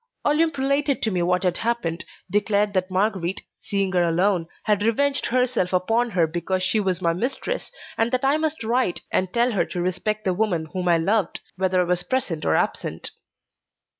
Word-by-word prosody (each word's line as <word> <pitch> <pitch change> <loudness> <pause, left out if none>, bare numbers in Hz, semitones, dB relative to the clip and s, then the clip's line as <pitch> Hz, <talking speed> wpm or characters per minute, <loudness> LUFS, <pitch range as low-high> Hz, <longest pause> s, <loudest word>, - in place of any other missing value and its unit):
Olympe 310 +1 +2
related 280 +1 +1
to 220 - +1
me 180 -2 0
what 180 +2 +1
had 180 -2 +1
happened, 225 -8 -2 0.3
declared 205 0 +1
that 185 -1 0
Marguerite, 190 -1 -1 0.2
seeing 195 -1 -1
her 180 -1 +3
alone, 175 +1 +1 0.2
had 210 -1 +1
revenged 275 +6 +1
herself 250 -7 +1
upon 225 +7 +2
her 180 -6 +2
because 175 +3 -2
she 215 +3 +2
was 190 -2 -1
my 170 -1 +3
mistress, 265 - -3 0.3
and 225 +1 +2
that 255 +1 0
I 280 +3 +3
must 315 -3 -2
write 235 -4 0
and 185 -1 0
tell 240 +3 +2
her 200 - +2
to 180 - -5
respect 210 +4 -1
the 185 - +2
woman 180 -5 0
whom 180 -1 -2
I 170 -1 +5
loved, 195 +4 0
whether 185 0 +1
I - - +3
was 180 0 0
present 180 -5 -2
or - - +3
absent. 80 - -2
195 Hz, 190 wpm, -23 LUFS, 180-235 Hz, 0.3 s, I